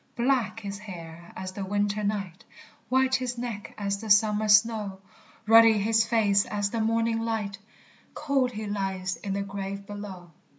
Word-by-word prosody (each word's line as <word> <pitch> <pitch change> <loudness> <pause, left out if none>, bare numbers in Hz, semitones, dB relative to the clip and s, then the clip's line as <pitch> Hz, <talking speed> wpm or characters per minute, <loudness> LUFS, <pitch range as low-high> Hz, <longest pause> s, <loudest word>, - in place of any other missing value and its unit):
_ - - -39
Black 235 -3 0
his 200 -1 -6
hair 170 -4 -10
as 185 0 -5
the 195 +1 -5
winter 205 +2 -1
night, 200 -4 -3 0.5
White 260 +1 +2
his 250 -2 0
neck 235 -4 -6
as 200 -1 -2
the 220 - -7
summer 210 +1 +4
snow, 210 -2 +3 0.5
Ruddy 225 0 +7
his 220 +2 +2
face 205 -4 +3
as 205 -1 -1
the 230 - -1
morning 225 +1 +1
light; 220 -3 -3 0.6
Cold 275 -4 0
he 215 0 -5
lies 195 -2 -2
in 195 - -4
the 200 0 -1
grave 200 0 -6
below. 195 -4 -8
210 Hz, 165 wpm, -27 LUFS, 200-225 Hz, 0.6 s, Ruddy